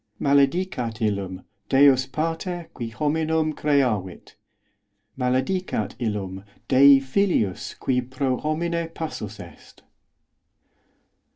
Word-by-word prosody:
os -, -, -20 dB
Maledicat 140 Hz, -4 st, +1 dB
illum 100 Hz, -4 st, -2 dB, 0.3 s
Deus 135 Hz, -1 st, +5 dB
Pater 165 Hz, +3 st, -3 dB
qui 120 Hz, -3 st, -5 dB
homi 150 Hz, +8 st, -1 dB
os 155 Hz, -, -1 dB
nem 160 Hz, -1 st, +1 dB
creavit. 125 Hz, -, -1 dB, 0.8 s
Maledicat 130 Hz, -, -1 dB
illum 100 Hz, -5 st, -3 dB, 0.2 s
Dei 140 Hz, +1 st, +7 dB
Filius 135 Hz, -, 0 dB
qui 125 Hz, -1 st, +1 dB
pro 130 Hz, +1 st, -2 dB
homine 170 Hz, +2 st, -2 dB
passus 110 Hz, -10 st, -6 dB
est. -, -, -14 dB
135 Hz, 100 wpm, -24 LUFS, 110-160 Hz, 0.8 s, Dei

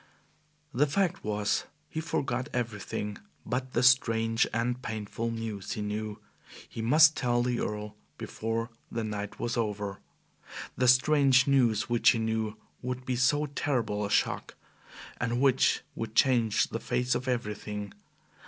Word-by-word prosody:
The 145 Hz, +5 st, +3 dB
fact 180 Hz, +4 st, 0 dB
was, 105 Hz, -1 st, 0 dB, 0.2 s
he 160 Hz, -, -4 dB
forgot 135 Hz, -4 st, -2 dB
everything 105 Hz, -3 st, -3 dB, 0.3 s
but 130 Hz, +1 st, -3 dB
the 120 Hz, -, +1 dB
strange 115 Hz, -3 st, +4 dB
and 120 Hz, +2 st, -1 dB
painful 110 Hz, 0 st, -4 dB
news 115 Hz, -3 st, -4 dB
he 110 Hz, -, -4 dB
knew 105 Hz, 0 st, -4 dB, 0.5 s
he 115 Hz, -, -6 dB
must 155 Hz, +7 st, +6 dB
tell 120 Hz, -2 st, +1 dB
the 125 Hz, -1 st, 0 dB
Earl 105 Hz, 0 st, -4 dB, 0.2 s
before 115 Hz, +1 st, -3 dB, 0.2 s
the 115 Hz, -1 st, -2 dB
night 105 Hz, -1 st, -5 dB
was 120 Hz, -, -2 dB
over 105 Hz, -3 st, -2 dB, 0.8 s
the 125 Hz, +2 st, +1 dB
strange 130 Hz, 0 st, +5 dB
news 120 Hz, -6 st, +3 dB
which 120 Hz, -1 st, +4 dB
he -, -, +3 dB
knew 110 Hz, -1 st, -1 dB, 0.2 s
would 125 Hz, 0 st, -4 dB
be 130 Hz, -, -1 dB
so 145 Hz, +4 st, +2 dB
terrible 120 Hz, -7 st, -1 dB
a 100 Hz, -, -2 dB
shock, -, -, 0 dB, 0.6 s
and 120 Hz, 0 st, -1 dB
which 135 Hz, -1 st, +3 dB
would 115 Hz, -1 st, -6 dB
change 120 Hz, -5 st, +3 dB
the -, -, -3 dB
face 125 Hz, 0 st, 0 dB
of 130 Hz, -, -3 dB
everything. 105 Hz, -4 st, -3 dB
115 Hz, 145 wpm, -29 LUFS, 110-125 Hz, 0.8 s, must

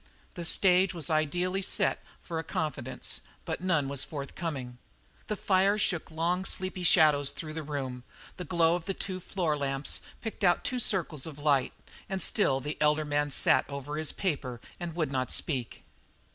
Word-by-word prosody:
The 175 Hz, -, -5 dB
stage 185 Hz, +1 st, +4 dB
was 165 Hz, 0 st, -3 dB
ideally 175 Hz, +5 st, +1 dB
set -, -, +1 dB, 0.2 s
for 165 Hz, -2 st, -3 dB
a -, -, -3 dB
confidence, 140 Hz, -5 st, -3 dB, 0.2 s
but -, -, -3 dB
none 165 Hz, -7 st, +2 dB
was 140 Hz, -1 st, 0 dB
forthcoming. 140 Hz, -4 st, -5 dB, 0.5 s
The 210 Hz, -, -1 dB
fire 195 Hz, +1 st, +3 dB
shook 175 Hz, -5 st, 0 dB
long, 170 Hz, +3 st, 0 dB
sleepy 185 Hz, -1 st, -1 dB
shadows 150 Hz, -5 st, +5 dB
through 155 Hz, -2 st, -5 dB
the 160 Hz, -, -3 dB
room, 135 Hz, -4 st, -4 dB, 0.3 s
the 180 Hz, -, -4 dB
glow 165 Hz, -1 st, +3 dB
of 175 Hz, -1 st, -2 dB
the 195 Hz, -, -2 dB
two 185 Hz, -1 st, -4 dB
floor 175 Hz, -4 st, -1 dB
lamps 135 Hz, -1 st, -2 dB, 0.2 s
picked 225 Hz, -2 st, -6 dB
out 175 Hz, -2 st, +4 dB
two 250 Hz, -, -1 dB
circles 165 Hz, -, -1 dB
of 150 Hz, -3 st, -8 dB
light, 145 Hz, -3 st, +2 dB, 0.4 s
and 190 Hz, 0 st, -1 dB
still 135 Hz, -6 st, +2 dB
the 145 Hz, +3 st, -4 dB
elder 150 Hz, +1 st, +3 dB
man 145 Hz, 0 st, +1 dB
sat 135 Hz, -, +4 dB
over 140 Hz, +1 st, -5 dB
his 155 Hz, -1 st, 0 dB
paper 140 Hz, -, -2 dB, 0.2 s
and 170 Hz, -2 st, -5 dB
would 155 Hz, -5 st, 0 dB
not 130 Hz, -2 st, -1 dB
speak. 130 Hz, -7 st, -2 dB
155 Hz, 175 wpm, -30 LUFS, 140-180 Hz, 0.5 s, shadows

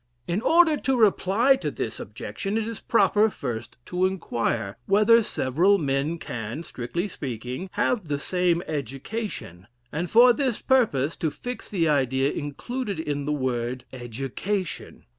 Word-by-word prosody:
In 175 Hz, +5 st, 0 dB
order 325 Hz, +1 st, +5 dB
to 265 Hz, -2 st, 0 dB
reply 220 Hz, +4 st, +4 dB
to -, -, -2 dB
this -, -, -4 dB
objection, 200 Hz, +1 st, -4 dB
it 225 Hz, -1 st, -1 dB
is 230 Hz, -2 st, -5 dB
proper 210 Hz, 0 st, +3 dB
first 120 Hz, -, -5 dB
to 180 Hz, +1 st, +1 dB
inquire, 115 Hz, -, -2 dB
whether 215 Hz, +4 st, +6 dB
several 180 Hz, -, +2 dB
men 145 Hz, +1 st, 0 dB
can, 120 Hz, +1 st, -5 dB
strictly 170 Hz, +7 st, -4 dB
speaking, 130 Hz, -, -5 dB
have 215 Hz, -9 st, 0 dB
the 145 Hz, -1 st, -1 dB
same 175 Hz, +3 st, +1 dB
education; 140 Hz, -, -5 dB, 0.2 s
and 165 Hz, +3 st, -2 dB
for 240 Hz, +2 st, +7 dB
this 260 Hz, -4 st, -1 dB
purpose 170 Hz, -, +2 dB
to 160 Hz, -, 0 dB
fix 245 Hz, +10 st, -7 dB
the 170 Hz, -5 st, +1 dB
idea 135 Hz, -1 st, +2 dB
included 200 Hz, -, -4 dB
in 145 Hz, -3 st, -2 dB
the 150 Hz, -, -1 dB
word 125 Hz, -3 st, -2 dB
Education. 135 Hz, -, -4 dB
170 Hz, 140 wpm, -25 LUFS, 130-210 Hz, 0.2 s, for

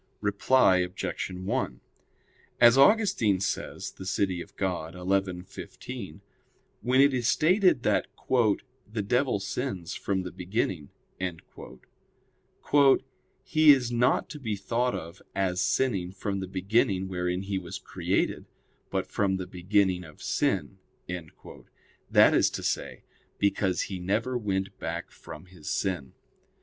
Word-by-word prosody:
Reply 100 Hz, 0 st, +3 dB
Obj. 90 Hz, 0 st, -2 dB
1: 90 Hz, -, -3 dB, 0.8 s
As 120 Hz, 0 st, +8 dB
Augustine 140 Hz, -, +4 dB
says 95 Hz, -, -3 dB
(De -, -, -10 dB
Civ. 95 Hz, +1 st, +1 dB
Dei 90 Hz, -2 st, -3 dB
xi, 95 Hz, 0 st, 0 dB
15), 100 Hz, -1 st, -9 dB, 0.6 s
when 130 Hz, +2 st, +2 dB
it 140 Hz, 0 st, +6 dB
is 120 Hz, -2 st, 0 dB
stated 180 Hz, -, +3 dB
that -, -, +2 dB, 0.2 s
"the 115 Hz, -1 st, 0 dB
devil 125 Hz, +2 st, +1 dB
sins 95 Hz, -3 st, -4 dB
from 95 Hz, -2 st, -2 dB
the 90 Hz, -, -6 dB
beginning," 90 Hz, -4 st, -2 dB, 2.5 s
"he 155 Hz, -1 st, +6 dB
is 125 Hz, -4 st, +3 dB
not 120 Hz, +1 st, +2 dB
to 150 Hz, -, -7 dB
be 110 Hz, -6 st, -2 dB
thought 120 Hz, +5 st, -1 dB
of 85 Hz, +3 st, -8 dB
as 95 Hz, -1 st, 0 dB
sinning 100 Hz, -7 st, +1 dB
from 100 Hz, +1 st, -3 dB
the 95 Hz, -, -4 dB
beginning 95 Hz, +1 st, +1 dB
wherein 90 Hz, 0 st, -2 dB
he 95 Hz, -1 st, -2 dB
was 85 Hz, -2 st, -7 dB
created, -, -, -2 dB, 0.4 s
but -, -, -1 dB
from 95 Hz, -2 st, 0 dB
the 95 Hz, -, -4 dB
beginning 95 Hz, 0 st, +1 dB
of 75 Hz, -3 st, -13 dB
sin": -, -, 0 dB, 1.3 s
that -, -, +6 dB
is -, -, +4 dB
to -, -, -6 dB
say, -, -, -2 dB, 0.3 s
because 100 Hz, -2 st, +1 dB
he 95 Hz, -2 st, -4 dB
never 105 Hz, +8 st, -1 dB
went 95 Hz, -5 st, -2 dB
back -, -, -4 dB
from -, -, -11 dB
his 90 Hz, -4 st, -10 dB
sin. 90 Hz, -9 st, -2 dB
100 Hz, 125 wpm, -28 LUFS, 90-120 Hz, 2.5 s, As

